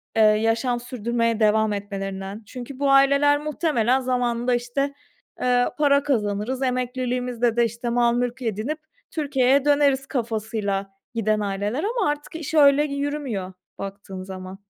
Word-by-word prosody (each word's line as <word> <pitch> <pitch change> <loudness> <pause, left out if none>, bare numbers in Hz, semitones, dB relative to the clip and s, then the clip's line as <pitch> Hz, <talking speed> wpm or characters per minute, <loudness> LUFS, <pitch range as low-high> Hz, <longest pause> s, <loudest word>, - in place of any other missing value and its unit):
eee, 225 - +4
yaşam 225 +3 +2
sürdürmeye 235 -1 -1
devam 215 0 +3
etmelerinden. 195 0 -5
Çünkü 255 +4 -9
bu 280 -1 +2
aileler 280 +1 +5
muhtemelen 290 -5 +1
zamanında, 245 -1 0
işte, 245 +4 -2 0.5
eee, 245 0 +3
para 285 -2 +4
kazanırız, 225 -1 -1
emekliliğimizde 250 -2 -1
de, 235 - +5
işte, 235 +2 -4
mal 235 0 +3
mülk 245 +1 -2
edinip 230 +7 -2 0.3
Türkiye'ye 280 -3 +2
döneriz 285 -2 +3
kafasıyla 220 -5 -2 0.3
giden 215 -1 +1
aileler 205 - -2
ama 440 -6 0
artık 295 +2 -4
iş 320 -1 -5
öyle 290 -1 +6
y 280 -2 -3
yürümüyor 275 -10 -3 0.2
baktığın 195 -1 -7
zaman. 190 +1 -9
245 Hz, 135 wpm, -23 LUFS, 215-275 Hz, 0.5 s, öyle